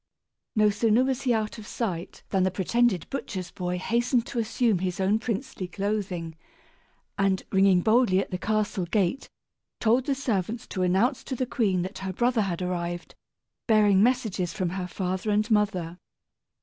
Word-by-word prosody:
No 215 -1 +4
sooner 220 +3 +3
was 265 0 -1
he 255 - +1
out 215 0 -2
of 210 - -10
sight 185 -7 -4
than 190 - +1
the 185 - +3
pretended 190 +1 +1
butcher's 190 -9 -4
boy 180 -1 -3
hastened 235 +5 +1
to 240 - -3
assume 225 -2 +1
his 180 0 -2
own 195 +3 +2
princely 225 -4 -4
clothing, 190 -4 -3 0.8
and, 195 -1 +2
ringing 190 -2 +4
boldly 220 -2 +3
at 195 - -1
the 180 - -3
castle 210 -3 0
gate, 200 +7 0 0.5
told 240 +4 +2
the 280 - +1
servants 225 -4 -2
to 185 - -3
announce 200 +9 +2
to 260 - -3
the 255 - -1
queen 200 -8 0
that 190 +2 -6
her 190 -1 -4
brother 240 +3 +2
had 185 -3 -2
arrived, 175 -1 -3 0.5
bearing 210 -4 +5
messages 220 -7 +1
from 180 -2 -1
her 180 0 -4
father 185 +2 -3
and 210 +2 +1
mother. 185 -5 +1
200 Hz, 165 wpm, -26 LUFS, 185-230 Hz, 0.8 s, bearing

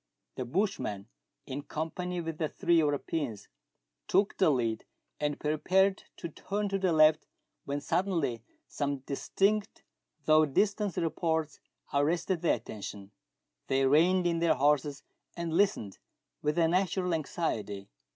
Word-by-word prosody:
The 130 - -4
bushman, 120 - -2 0.4
in 135 +1 -5
company 175 +4 -4
with 165 -1 -5
the 155 -2 0
three 170 -1 +2
Europeans, 145 -6 -1 0.6
took 195 +2 +2
the 185 -4 +5
lead, 115 -5 0 0.3
and 150 -1 -1
prepared 190 +6 +2
to 170 - -5
turn 205 +6 -3
to 195 0 -1
the 185 -2 +2
left, 155 -1 +5 0.4
when 140 +1 -2
suddenly 165 -6 0 0.3
some 140 -2 -2
distinct, 200 +10 0 0.4
though 155 0 +5
distant 205 +6 +1
reports, 160 -2 -1 0.3
arrested 165 +5 +1
their 170 - +3
atten 110 -2 -9
tion. 100 0 -7 0.6
They 135 0 +2
reined 175 +6 +4
in 170 -1 +1
their 165 -2 +3
horses, 145 +1 +1 0.3
and 170 -1 -3
Hstened 175 - +1 0.4
with 150 +2 0
a 165 -1 +4
natural 180 +1 +1
anxiety. 110 - -2
160 Hz, 130 wpm, -30 LUFS, 140-180 Hz, 0.6 s, the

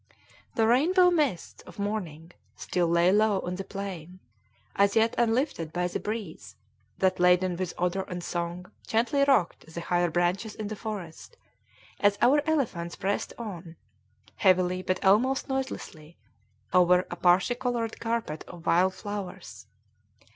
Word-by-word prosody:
The 225 - +3
rainbow 355 - +4
mists 290 - -1
of - - -13
morning 180 -6 -4 0.2
still 175 -2 -1
lay 170 +2 +3
low 210 -1 +3
on 180 - -4
the 195 - -4
plain, 185 -3 -7 0.6
as 200 0 +3
yet 225 +1 +3
unlifted 235 - 0
by 180 +1 -1
the 180 - -4
breeze 210 -6 -6 0.4
that, 190 -1 +1
laden 180 0 +3
with 180 0 -4
odor 180 +2 0
and 180 -1 -6
song, 175 +2 -4 0.2
gently 245 +5 +2
rocked 180 - +1
the 170 - -6
higher 175 +1 0
branches 180 +6 -1
in 215 -1 -5
the 215 - -4
forest, 205 - -7 0.6
as 205 0 +3
our 285 +4 +4
elephants 195 - -1
pressed 200 +1 -2
on, 180 -7 -8 0.6
heavily 185 -1 +3
but 185 0 -2
almost 245 +8 +3
noiselessly, 260 - -5 0.6
over 180 0 +5
a - - -3
parti 180 +6 +3
colored 240 -2 -3
carpet 230 -9 -3
of 175 -1 -12
wild 185 +3 +3
flowers. 195 - -7
190 Hz, 140 wpm, -27 LUFS, 175-225 Hz, 0.6 s, over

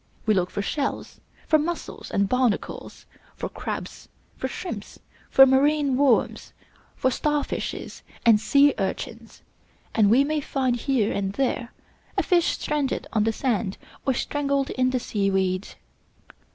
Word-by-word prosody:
We 215 - +4
look 180 -2 +1
for 200 - -3
Shells, 280 +5 -3 0.3
for 310 - +4
Mussels 345 +3 -4
and 200 0 +1
Barnacles, 250 -2 -1 0.3
for - - -4
Crabs, - - -6 0.3
for - - -3
Shrimps, - - -7 0.3
for 270 - +8
Marine 280 +1 +3
Worms, 270 -3 +1 0.4
for 260 - +1
Star 295 +3 0
Fishes - - -5 0.2
and 225 -3 +6
Sea 280 +5 +4
Urchins, - - -5 0.5
and 215 -3 +4
we 250 +6 +5
may 305 +1 -1
find 260 -3 0
here 240 -3 0
and 195 -1 -2
there 250 -1 -1 0.5
a - - +3
fish 350 -3 +2
stranded 295 -3 -1
on 215 -1 +2
the 225 - +2
sand 220 -5 -1 0.3
or 265 - +1
strangled 280 -1 -1
in 255 0 +1
the 255 0 0
sea 205 -4 -1
weed. 190 0 0
260 Hz, 145 wpm, -25 LUFS, 215-280 Hz, 0.5 s, for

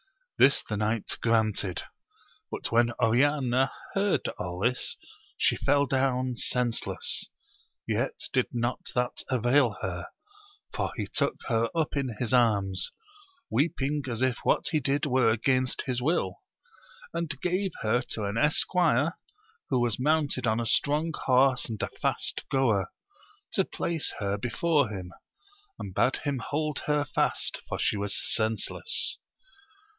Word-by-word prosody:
This 140 - +5
the 105 - -2
knight 110 +1 -1
granted. 110 -5 +1 0.7
But - - -4
when 120 +1 +4
Oriana 130 +2 +3 0.2
heard 200 0 +1
all 90 0 -4
this, 125 +3 0 0.4
she - - +3
fell 140 0 +2
down 130 -2 0
sense 120 -2 0
less; - - 0 0.6
yet - - 0 0.2
did - - +2
not 120 +1 -1 0.2
that 125 0 0
avail 125 -2 +3
her, 85 -3 -3 0.7
for - - -1
he - - -2
took - - 0
her 115 -1 +2
up 160 -2 0
in 130 -5 -2
his 120 +1 -1
arms, 100 -6 +2 0.6
weeping 145 -1 0
as 120 +1 -1
if 130 -2 +1
what - - +2
he 155 - +2
rdid 140 +2 +1
were 130 -4 +3
against 130 +3 +1
his 125 -2 -2
will, 130 - 0 0.7
and 165 -4 -2
gave 185 +2 +1
her 110 +3 +2
to 110 - -2
an 100 +3 -1
esquire 155 0 +2 0.5
who 130 - +2
was 120 -3 0
mounted 145 -3 +1
on 110 +1 +2
a 120 - -1
strong 150 +7 +1
horse 130 -1 +3
and 110 -2 -4
a - - -1
fast - - 0
goer, 115 -8 +2 0.6
to - - +3
place 170 -3 -2
her 100 -1 -1
before 140 +4 +1
him, 90 -4 -7 0.6
and 95 - -7
bade 125 +7 +2
him 140 -4 -1
hold 150 +3 -2
her 150 -1 +2
fast, 135 - 0
for - - -2
she 105 - +1
was 100 -1 -1
senseless. 110 - +1
125 Hz, 140 wpm, -28 LUFS, 110-145 Hz, 0.7 s, This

